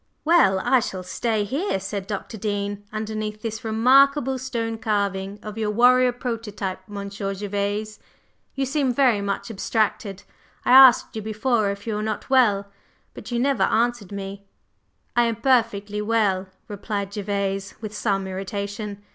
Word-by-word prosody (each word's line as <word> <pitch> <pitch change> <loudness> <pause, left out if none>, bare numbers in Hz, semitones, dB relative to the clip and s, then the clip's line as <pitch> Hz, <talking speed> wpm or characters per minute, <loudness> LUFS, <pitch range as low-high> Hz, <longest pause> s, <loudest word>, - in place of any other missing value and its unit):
"Well, 320 - +5
I 255 +4 +4
shall 190 -5 -4
stay 210 +4 -1
here," 275 - -1
said 195 0 -5
Dr. 205 +2 -5
Dean, 205 -1 -3
"underneath 215 0 -4
this 225 0 -4
remarkable 265 +4 +4
stone 230 -3 -3
carving 200 -3 -1
of 215 +1 -7
your 215 -1 0
warrior 250 +3 +5
prototype, 225 -6 -4
Monsieur 200 -1 -5
Gervase. 205 +1 -3 0.6
You 270 0 0
seem 270 -1 0
very 245 -5 +3
much 200 +3 -3
abstracted. 205 -1 -1 0.4
I - - +2
asked 260 -3 +7
you 220 - -3
before 215 0 0
if 200 0 -5
you 225 - -2
were 210 - -2
not 220 +4 -4
well; 210 -7 +4 0.5
but - - -10
you 240 - -1
never 270 +2 +1
answered 235 -3 +1
me." 200 0 -7 0.7
"I 240 0 +4
am 230 -1 0
perfectly 220 -4 +1
well," 210 -4 +1 0.2
replied 200 -1 -4
Gervase, 200 -1 -2
with 215 -2 -7
some 200 -2 0
irritation. 200 +2 -5
215 Hz, 145 wpm, -23 LUFS, 200-235 Hz, 0.7 s, asked